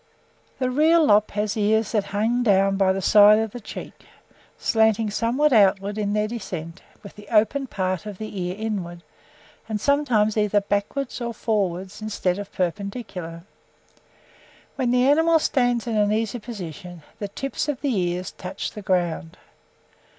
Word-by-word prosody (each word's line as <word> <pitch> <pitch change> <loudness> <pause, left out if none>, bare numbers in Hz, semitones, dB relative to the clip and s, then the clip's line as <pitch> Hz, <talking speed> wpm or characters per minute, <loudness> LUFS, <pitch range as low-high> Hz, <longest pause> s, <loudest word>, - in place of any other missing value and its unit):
"The 255 -1 -1
real 315 +4 +4
lop 210 -3 +4
has 210 0 -1
ears 220 0 +1
that 210 -3 0
hang 220 +5 0
down 195 -3 +3
by 195 -1 +3
the 190 0 -2
side 210 +2 +7
of 220 -1 -1
the 245 - -7
cheek, 215 - -10 0.5
slanting 220 -1 +2
somewhat 255 +7 +1
outward 200 -1 +3
in 205 -1 -1
their 210 0 +1
descent, 180 -8 -6 0.2
with 200 - -11
the 205 0 -13
open 230 +5 +2
part 185 -1 -2
of 205 -3 -7
the 215 -2 -6
ear 180 +1 -3
inward, 185 -6 -4 0.7
and 215 -1 -2
sometimes 245 -6 +2
either 210 -1 +3
backwards 205 +7 -2
or 235 -1 -4
forwards 195 -3 -2
instead 200 -3 -1
of 205 -1 -7
perpendicular: 180 -2 -4 1.3
when 255 -3 0
the 250 +1 +3
animals 320 +2 +4
stand 245 -3 +1
in 230 -2 -2
an 210 0 +2
easy 225 +2 -1
position, 180 -6 -8 0.2
the 205 - -3
tips 275 +8 -4
of 285 - -3
the 275 -5 0
ears 180 -1 -2
touch 180 0 -6
the 210 - -8
ground. 175 -4 -1
210 Hz, 160 wpm, -23 LUFS, 195-235 Hz, 1.3 s, side